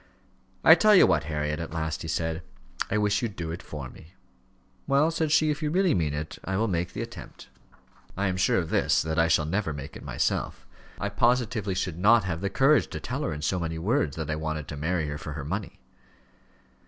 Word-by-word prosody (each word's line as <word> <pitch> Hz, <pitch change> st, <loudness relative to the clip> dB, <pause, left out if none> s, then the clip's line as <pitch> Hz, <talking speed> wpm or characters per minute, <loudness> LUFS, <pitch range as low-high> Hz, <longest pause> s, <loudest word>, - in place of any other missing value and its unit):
"I -, -, +10 dB
tell 215 Hz, -1 st, +5 dB
you -, -, +8 dB
what, 75 Hz, -1 st, +2 dB
Harriet," 75 Hz, 0 st, -2 dB
at 85 Hz, 0 st, -6 dB
last 80 Hz, -4 st, -2 dB
he -, -, -5 dB
said; 80 Hz, +1 st, -2 dB, 0.5 s
"I 105 Hz, -, +1 dB
wish 105 Hz, -1 st, +1 dB
you'd 115 Hz, -5 st, -3 dB
do 80 Hz, -2 st, -4 dB
it 85 Hz, -, -6 dB
for 75 Hz, -4 st, -7 dB
me." 80 Hz, +8 st, -16 dB, 0.7 s
"Well," 140 Hz, +4 st, +3 dB
said 160 Hz, -2 st, -1 dB
she, 155 Hz, 0 st, +4 dB
"if 150 Hz, -, -4 dB
you 150 Hz, -, 0 dB
really 180 Hz, +1 st, +2 dB
mean 75 Hz, -, 0 dB
it, 75 Hz, +1 st, -5 dB
I 95 Hz, 0 st, -2 dB
will 115 Hz, +2 st, +1 dB
make 90 Hz, -3 st, -2 dB
the -, -, -3 dB
attempt." -, -, -11 dB, 0.7 s
"I 100 Hz, -, 0 dB
am 95 Hz, -2 st, 0 dB
sure 90 Hz, -1 st, +2 dB
of 85 Hz, -4 st, -2 dB
this, -, -, +2 dB
that 80 Hz, +1 st, -1 dB
I 80 Hz, -, +4 dB
shall 80 Hz, -2 st, +3 dB
never 95 Hz, 0 st, -1 dB
make 70 Hz, -1 st, -8 dB
it -, -, -9 dB
myself. -, -, -2 dB, 0.3 s
I 100 Hz, -, -2 dB
positively 110 Hz, -2 st, +1 dB
should 90 Hz, -3 st, -3 dB
not 110 Hz, +3 st, +5 dB
have 85 Hz, -2 st, -3 dB
the 100 Hz, -, -1 dB
courage 140 Hz, +6 st, +4 dB
to -, -, -6 dB
tell 130 Hz, +3 st, -4 dB
her 150 Hz, -, -1 dB
in 75 Hz, 0 st, -5 dB
so 90 Hz, +3 st, 0 dB
many 80 Hz, -1 st, -3 dB
words, 90 Hz, -, 0 dB
that 80 Hz, -1 st, -3 dB
I -, -, 0 dB
wanted 80 Hz, -1 st, -4 dB
to 75 Hz, -, -5 dB
marry 80 Hz, +2 st, -1 dB
her 75 Hz, 0 st, -5 dB
for 75 Hz, -, -6 dB
her 75 Hz, -2 st, -6 dB
money." 95 Hz, +3 st, -4 dB
90 Hz, 230 wpm, -27 LUFS, 80-110 Hz, 0.7 s, I